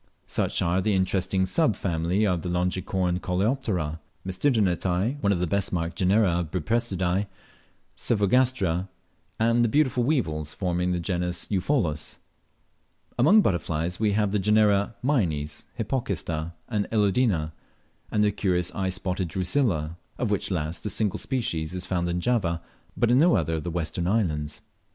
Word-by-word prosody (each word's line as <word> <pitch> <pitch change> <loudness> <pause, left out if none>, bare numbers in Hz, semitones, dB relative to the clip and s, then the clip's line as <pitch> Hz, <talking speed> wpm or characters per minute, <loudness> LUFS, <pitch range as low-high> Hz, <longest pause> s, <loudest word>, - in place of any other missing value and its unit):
Such - - 0
are 90 +2 +1
the 105 +1 +1
interesting 95 0 +1
sub 145 - +2
family 90 +4 0
of 90 -4 0
Longicorn 90 0 0
coleoptera 90 - -1 0.3
Tmesisternitae; 95 - +1
one 100 - +2
of 100 - +2
the 90 - 0
best 100 +3 0
marked 85 -2 -2
genera 95 0 +3
of 85 -3 -3
Buprestidae 95 +1 0 0.7
Cyphogastra; 100 -5 +1 0.5
and 115 +1 +3
the 120 - +2
beautiful 130 -2 +2
weevils 80 - -1
forming 90 -1 0
the 90 - 0
genus 90 0 -2
Eupholus. 95 - 0 1.0
Among 185 - +7
butterflies 85 - -1
we 105 -2 +2
have 105 -1 +1
the 105 - +1
genera 105 +1 +3
Mynes, 80 - 0
Hypocista, 85 - -2
and 105 -3 -1
Elodina, 100 -6 +2 0.6
and 105 -1 +2
the 105 - +3
curious 90 -4 0
eye 95 -2 -1
spotted 95 0 -2
Drusilla, 90 - 0 0.2
of 115 -4 -1
which 105 - 0
last 80 -2 -3
a - - -1
single 105 0 -1
species 90 - -2
is 90 - -4
found 85 -1 -1
in 85 0 -1
Java, 90 -8 +1 0.4
but 120 - +3
in 125 - +5
no 170 0 +5
other 80 -4 0
of 80 - -1
the 90 - -3
western 85 +1 -2
islands. 80 -8 0
95 Hz, 145 wpm, -26 LUFS, 85-110 Hz, 1.0 s, Among